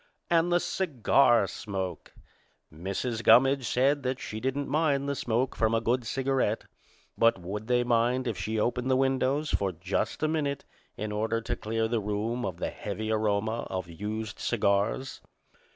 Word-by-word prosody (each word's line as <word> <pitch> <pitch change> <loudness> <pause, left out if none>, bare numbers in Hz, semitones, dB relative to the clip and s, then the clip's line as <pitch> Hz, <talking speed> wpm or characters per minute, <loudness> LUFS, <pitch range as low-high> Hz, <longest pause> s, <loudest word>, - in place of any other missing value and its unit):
And 170 +1 +3
the 175 - +4
cigar 135 - +3
smoke! 95 -1 -5 0.6
Mrs. 100 +8 -3
Gummidge 130 +3 +5
said 140 +3 +2
that 130 0 -2
she 110 - -5
didn't 135 +3 -2
mind 145 -3 +1
the 140 - 0
smoke 125 -1 -1
from 110 0 +2
a - - +3
good 120 +1 0
cigarette, 135 -4 0 0.6
but 115 -2 +5
would 100 +5 -6
they 125 0 +3
mind 120 +2 +2
if 115 -4 -1
she 110 +5 -2
opened 125 +3 0
the 130 - +4
windows 135 +3 +1
for 100 -1 +1
just 90 - -2
a - - +4
minute 145 -3 -1 0.3
in 110 0 -3
order 110 +2 0
to - - -3
clear 110 +1 -1
the 115 0 0
room 110 +4 -2
of 90 - -5
the - - -3
heavy 110 +2 -4
aroma 110 +1 0
of 95 -2 -3
used 105 +5 -5
cigars? 105 +4 0
115 Hz, 165 wpm, -28 LUFS, 105-130 Hz, 0.6 s, Gummidge